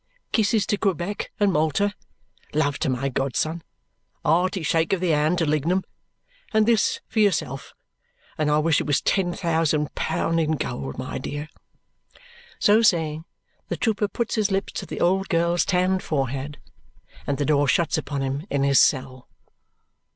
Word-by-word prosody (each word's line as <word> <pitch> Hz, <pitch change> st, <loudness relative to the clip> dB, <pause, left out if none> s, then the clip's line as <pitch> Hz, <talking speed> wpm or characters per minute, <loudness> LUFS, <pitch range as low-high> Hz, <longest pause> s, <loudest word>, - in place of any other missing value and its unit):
Kisses 220 Hz, -1 st, +2 dB
to 205 Hz, -, 0 dB
Quebec 195 Hz, 0 st, -2 dB
and 205 Hz, -2 st, +3 dB
Malta, 160 Hz, +7 st, +1 dB, 0.6 s
love 145 Hz, -2 st, +1 dB
to -, -, 0 dB
my 130 Hz, +1 st, -1 dB
godson, 140 Hz, +5 st, -1 dB, 0.6 s
a -, -, +1 dB
hearty 180 Hz, +2 st, +1 dB
shake 165 Hz, +3 st, +1 dB
of 195 Hz, -, +1 dB
the 180 Hz, -1 st, 0 dB
hand 155 Hz, +3 st, +2 dB
to 165 Hz, -, +1 dB
Lignum, 160 Hz, +5 st, +1 dB, 0.7 s
and 220 Hz, 0 st, +3 dB
this 225 Hz, -2 st, +2 dB
for 220 Hz, -, -2 dB
yourself, 160 Hz, -10 st, 0 dB, 0.6 s
and 155 Hz, -1 st, 0 dB
I 150 Hz, -, +3 dB
wish 155 Hz, +1 st, +2 dB
it -, -, -5 dB
was 145 Hz, -, +2 dB
ten 185 Hz, -3 st, +1 dB
thousand 160 Hz, -4 st, 0 dB
pound 165 Hz, 0 st, -1 dB
in 160 Hz, -1 st, +1 dB
gold, 70 Hz, -, -4 dB
my -, -, -4 dB
dear!" 145 Hz, +1 st, -5 dB, 1.1 s
So 210 Hz, +2 st, +4 dB
saying, 160 Hz, -6 st, +1 dB, 0.4 s
the -, -, -3 dB
trooper 215 Hz, -2 st, 0 dB
puts 235 Hz, +2 st, -3 dB
his 215 Hz, -2 st, +1 dB
lips 195 Hz, 0 st, -2 dB
to -, -, -5 dB
the -, -, -6 dB
old 190 Hz, +2 st, +1 dB
girl's 170 Hz, 0 st, +2 dB
tanned 185 Hz, 0 st, +1 dB
forehead, 140 Hz, 0 st, -3 dB, 0.7 s
and 140 Hz, -, 0 dB
the 145 Hz, -, -1 dB
door 145 Hz, -1 st, +2 dB
shuts 160 Hz, +4 st, +2 dB
upon 145 Hz, -3 st, -3 dB
him 135 Hz, +6 st, -3 dB
in 140 Hz, -1 st, 0 dB
his 140 Hz, -1 st, +4 dB
cell. 130 Hz, -2 st, +1 dB
160 Hz, 165 wpm, -24 LUFS, 145-190 Hz, 1.1 s, So